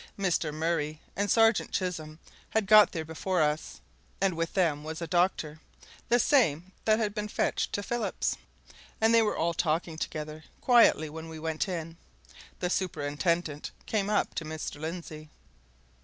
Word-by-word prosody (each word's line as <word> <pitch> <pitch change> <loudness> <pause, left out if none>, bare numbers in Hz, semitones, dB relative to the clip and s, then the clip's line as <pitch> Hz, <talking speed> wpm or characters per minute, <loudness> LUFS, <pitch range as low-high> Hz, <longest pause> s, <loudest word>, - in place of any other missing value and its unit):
Mr. 180 -5 0
Murray 155 -1 -1 0.2
and 205 +1 -1
Sergeant 225 +1 +4
Chisholm 160 -5 -3 0.3
had 220 -2 +1
got 210 +1 +7
there 160 -2 -4
before 175 +3 -2
us, 150 +1 -2 0.4
and 195 -1 +2
with 165 0 -2
them 160 -6 +1
was 160 +1 -5
a 170 - -3
doctor 175 -3 0 0.5
the 240 - +5
same 190 - +2
that 215 -1 +4
had 215 -2 -1
been 210 -1 -3
fetched - - -1
to 205 - -1
Phillips 240 +2 -1 0.6
and 225 +1 +4
they 230 - +6
were 215 - 0
all 170 +1 +1
talking 160 0 -1
together 155 0 -5 0.2
quietly 235 -10 +5
when 160 +2 -8
we 160 - -8
went 160 +3 -2
in. 165 -2 -5 0.6
The 180 - 0
superintendent 165 -2 -1 0.2
came 205 -2 -1
up 210 - +1
to - - -3
Mr. 155 -1 -6
Lindsey. 160 -2 -6
170 Hz, 155 wpm, -29 LUFS, 155-200 Hz, 0.6 s, got